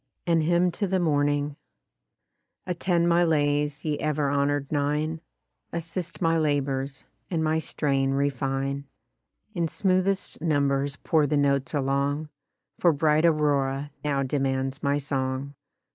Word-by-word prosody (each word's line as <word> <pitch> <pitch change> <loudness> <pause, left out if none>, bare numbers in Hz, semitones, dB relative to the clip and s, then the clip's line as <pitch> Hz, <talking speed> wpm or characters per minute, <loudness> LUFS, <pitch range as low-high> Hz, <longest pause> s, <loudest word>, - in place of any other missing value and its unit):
AN 165 -2 +3
HYMN 175 +3 +2
TO 200 +3 -2
THE 190 0 +1
MORNING 145 -2 +1 1.1
Attend 175 -1 +1
my 170 0 +4
lays, 145 -2 +1
ye 150 -2 -1
ever 150 -2 0
honor'd 140 0 0
nine; 150 +2 0 0.5
Assist 170 +2 -5
my 165 0 +3
labours, 140 -3 -1 0.2
and 165 -3 0
my 155 0 +1
strain 135 -4 0
refine; 135 0 -1 0.7
In 170 -4 0
smoothest 185 +2 0
numbers 140 -3 +1
pour 155 -1 +1
the 150 +1 +1
notes 140 0 +1
along, 140 +2 0 0.5
For 175 - +5
bright 155 +1 +2
aurora 145 -2 +1
now 140 -2 0
demands 135 0 -1
my 140 +1 +1
song. 135 -1 -2
145 Hz, 125 wpm, -26 LUFS, 140-160 Hz, 1.1 s, For